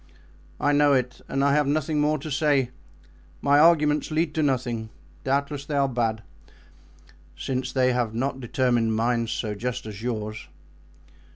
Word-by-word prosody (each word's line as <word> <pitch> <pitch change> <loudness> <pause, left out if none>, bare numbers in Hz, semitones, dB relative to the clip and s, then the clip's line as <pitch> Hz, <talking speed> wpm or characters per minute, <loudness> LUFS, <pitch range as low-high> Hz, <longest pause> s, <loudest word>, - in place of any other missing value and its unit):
"I 145 - +2
know 145 0 +4
it 125 -2 -1
and 135 +1 0
I 140 0 +3
have 150 -1 +2
nothing 150 +1 0
more 150 +1 +2
to 155 +1 -7
say; 140 -3 +2 0.7
my 145 +1 +4
arguments 150 -2 +4
lead 155 0 0
to 160 - 0
nothing; 120 -5 -1 0.3
doubtless 140 +1 -1
they 145 0 -4
are 140 -1 +3
bad, 115 -4 -1 1.1
since 130 -1 -3
they 130 -1 +2
have 120 -3 0
not 135 +3 -2
determined 120 -2 +1
minds 115 0 0
so 105 -3 -2
just 125 +4 -4
as 105 -1 -8
yours." 110 -4 -4
135 Hz, 155 wpm, -25 LUFS, 120-145 Hz, 1.1 s, know